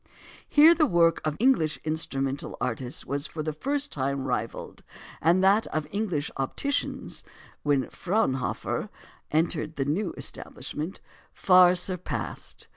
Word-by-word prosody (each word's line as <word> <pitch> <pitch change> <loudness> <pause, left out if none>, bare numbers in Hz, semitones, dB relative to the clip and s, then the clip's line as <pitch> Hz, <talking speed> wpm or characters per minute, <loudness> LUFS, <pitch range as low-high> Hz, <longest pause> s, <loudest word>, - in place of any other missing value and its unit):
Here 310 +3 +8
the 315 -3 +3
work 170 -5 +3
of 155 -1 -2
English 215 - +3
instrumental 140 -3 -2
artists 125 +1 -3
was 140 +3 -2
for 155 - -5
the 155 0 -2
first 285 - -1
time 135 -1 -1
rivalled, - - -3 0.4
and 175 +4 +4
that 200 +3 +4
of 155 -1 -2
English 195 -8 -2
opticians 280 - -2 0.4
when 140 -3 +1
Fraunhofer 170 - -1 0.4
entered 160 0 0
the 135 - -1
new 175 +7 0
establishment 160 +5 -6 0.3
far 180 -1 +6
surpassed. 180 0 -4
160 Hz, 120 wpm, -27 LUFS, 145-195 Hz, 0.4 s, Here